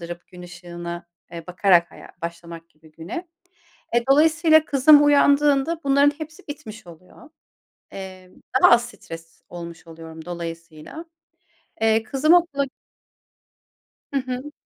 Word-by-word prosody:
dırıp 170 0 -9
gün 180 0 -13
ışığına, 175 -1 -8 0.3
eee, 165 -1 -9
bakarak 180 -1 +3
haya - - -14
başlamak 170 0 -8
gibi 155 -1 -22
güne. 215 - -8 0.7
Eee, 235 0 +2
dolayısıyla 315 +2 +4
kızım 290 +1 +5
uyandığında 290 +2 +3
bunların 280 +1 +4
hepsi 315 -1 -10
bitmiş 225 -8 -9
oluyor. 180 - -16 0.6
Emm, 185 -1 -10 0.3
daha - - +8
az 240 0 +4
stres 165 -7 -12
olmuş 170 -1 -10
oluyorum 160 -1 -11
dolayısıyla. 165 - -8 0.8
Eee, 225 0 +2
kızım 290 +7 +2
okula 295 -6 +2 1.4
Hı 280 - -4
hı. 255 +3 -6
190 Hz, 120 wpm, -22 LUFS, 170-285 Hz, 1.4 s, daha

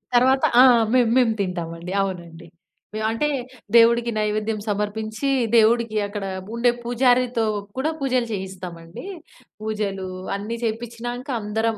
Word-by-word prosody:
తర్వాత 260 +2 +4 0.2
ఆ! - - +9 0.3
మేము 245 -3 +4
మేము 235 -3 +3
తింటామండి. 170 -2 -4
అవునండి. 170 -3 -6 0.6
అంటే 230 +7 0 0.5
దేవుడికి 235 0 +5
నైవేద్యం 215 +1 -1
సమర్పించి, 215 +5 -2 0.3
దేవుడికి 230 0 +4
అక్కడ 205 -1 -5 0.3
ఉండే 240 +1 +3
పూజారితో 245 -1 +2 0.3
కూడా 295 +5 0
పూజలు 255 -3 0
చేయిస్తామండి. 180 - -7 0.6
పూజలు 210 -3 -3 0.3
అన్నీ 210 +3 -4
చేపించినాక 235 +3 -4
అందరం, 220 +2 -1
220 Hz, 105 wpm, -23 LUFS, 200-240 Hz, 0.6 s, ఆ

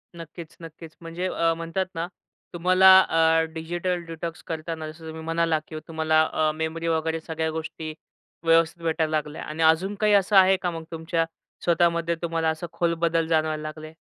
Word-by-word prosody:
नक्कीच, 165 0 -10
नक्कीच. 165 0 -11
म्हणजे 170 +2 -4
अ, 165 -2 +1
म्हणतात 165 +3 -2
ना 165 +1 -2 0.5
तुम्हाला 185 +2 +4 0.2
अ, 165 0 +4
डिजिटल 175 +2 -3
डिटॉक्स 165 0 -6
करताना 160 -1 -4
जसं 160 +1 -14
तुम्ही 160 0 -7
म्हणालात 165 -1 0
की 155 - -7
तुम्हाला 160 -1 +2
अ, 155 -1 0
मेमरी 160 +1 -3
वगैरे 160 0 0
सगळ्या 160 0 -3
गोष्टी 160 0 -6 0.5
व्यवस्थित 165 +1 +3
भेटायला 160 -1 0
लागल्या 150 0 -5
आणि 155 +2 -3
अजून 165 +6 +3
काही 210 +1 +2
असं 200 0 +3
आहे 190 0 +6
का, 180 - 0
मग 165 -1 -6
तुमच्या 165 0 -1 0.4
स्वतःमध्ये 170 0 +2
तुम्हाला 165 -1 0
असं 160 +2 -3
खोल 170 -1 0
बदल 165 -1 +2
जाणवायला 155 -1 +1
लागले? 155 +1 -8
165 Hz, 165 wpm, -25 LUFS, 160-170 Hz, 0.5 s, आहे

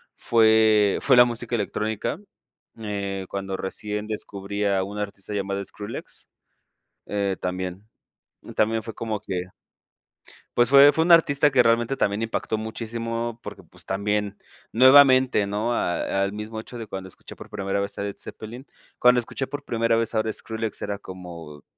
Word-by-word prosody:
fue 110 -3 +4
fue 135 - +5
la 125 - +10
música 120 0 -3
electrónica, 110 - -2 0.6
eh, 100 -2 -3
cuando 95 -1 -4
recién 105 +2 -4
descubrí 100 -1 -4
a 100 -1 +2
una 105 +2 -4
artista 100 0 -8
llamada 100 -1 -2
Skrillex, 105 +3 -7 0.8
eh, 100 -2 -1
también, 90 +2 -4 0.6
y - - -10
también 110 +1 +1
fue 115 0 -7
como 110 -2 -3
que. 95 -3 -4 1.1
Pues 120 0 +4
fue 140 +1 +8
fue 160 +3 +1
un 175 - +3
artista 150 -3 +5
que 130 -2 +4
realmente 115 +2 +2
también 100 -3 0
impactó 110 -1 -2
muchísimo 115 +1 -4
porque, - - -9
pues, - - -16
también 100 +1 -1 0.4
nuevamente, 130 -3 +6
¿no?, 105 +4 -1
a 95 -1 -1
al 100 +1 -2
mismo 105 +1 -6
hecho 120 +2 -9
de 115 -2 -7
cuando 95 -1 -6
escuché 95 - -13
por - - -11
primera 100 0 -2
vez 100 0 -4
a - - -3
Led 100 -1 -5
Zeppelin. 120 +5 -9 0.3
Cuando 125 0 +5
escuché 135 +3 -5
por 145 0 -6
primera 115 -3 +1
vez 115 -1 0
ahora 110 0 0
Skrillex 110 -1 -4
era 100 0 -3
como: 85 -6 -10
110 Hz, 160 wpm, -24 LUFS, 100-115 Hz, 1.1 s, la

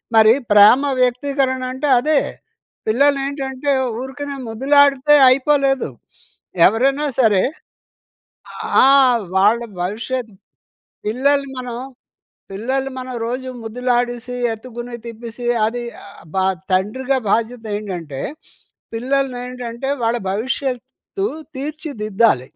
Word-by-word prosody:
మరి 220 0 +7 0.2
ప్రేమ 210 +6 +7 0.2
వ్యక్తీకరణ 260 +1 0
అంటే 275 +3 -2
అదే. 300 +2 +2 0.7
పిల్లలేంటంటే 275 +2 +1 0.3
ఊరికనే 280 +2 -6
ముద్దులాడితే 280 +4 +4
అయిపోలేదు. 270 - +2 0.8
ఎవరైనా 270 +8 +2
సరే 210 -5 +4 1.4
ఆ! - - +7 0.5
వాళ్ళ 210 +5 +4 0.2
భవిష్యత్తు 225 +3 -4 0.7
పిల్లలు 275 +5 +1
మనం 245 -2 -5 0.7
పిల్లలు 260 +7 -2
మనం 255 0 -6
రోజు 255 +2 -4
ముద్దులాడేసి, 245 +1 -1 0.2
ఎత్తుకుని 240 +1 -8
తిప్పేసి 235 +1 -8 0.2
అది 240 +2 -3 0.5
బ - - -3 0.3
తండ్రిగా 250 +9 0
బాధ్యతేంటంటే 205 - -2 0.7
పిల్లల్నేంటంటే 250 0 -3
వాళ్ళ 230 +1 +1
భవిష్యత్తు 260 - -3 0.3
తీర్చిదిద్దాలి. 230 - 0
250 Hz, 80 wpm, -19 LUFS, 225-270 Hz, 1.4 s, మరి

